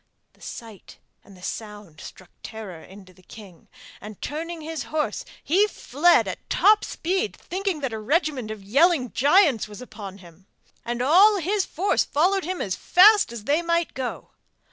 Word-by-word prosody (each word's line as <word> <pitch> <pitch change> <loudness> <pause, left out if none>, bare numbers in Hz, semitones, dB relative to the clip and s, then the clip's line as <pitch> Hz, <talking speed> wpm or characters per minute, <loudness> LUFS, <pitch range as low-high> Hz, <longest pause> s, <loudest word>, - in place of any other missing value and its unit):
The - - -29
sight 225 -4 -11 0.3
and 195 -2 -17
the 180 - -17
sound 205 -8 -8
struck 185 - -12
terror 205 -7 -9
into 190 0 -15
the 185 - -22
king, 190 -2 -15 0.3
and, 210 -1 -10
turning 330 +2 -5
his 315 -1 -5
horse, 305 -1 -2 0.2
he 390 +7 +3
fled 345 -2 +2
at - - -7
top 425 +1 +4
speed, 380 +5 -2
thinking 375 -4 -4
that 265 -4 -3
a 220 - -4
regiment 275 - -1
of 215 -2 -7
yelling 275 - +2
giants 285 - +3
was 210 0 -11
upon 210 -6 -9
him; 180 0 -18 0.4
and 240 +1 -3
all 385 +9 +5
his 385 +3 -1
force 380 +5 0
followed 365 +5 +1
him 370 +1 -4
as 185 -2 -3
fast 405 - +5
as 235 -3 -8
they 295 +8 +1
might 335 0 -1
go. 260 -2 -6
275 Hz, 165 wpm, -24 LUFS, 210-345 Hz, 0.4 s, all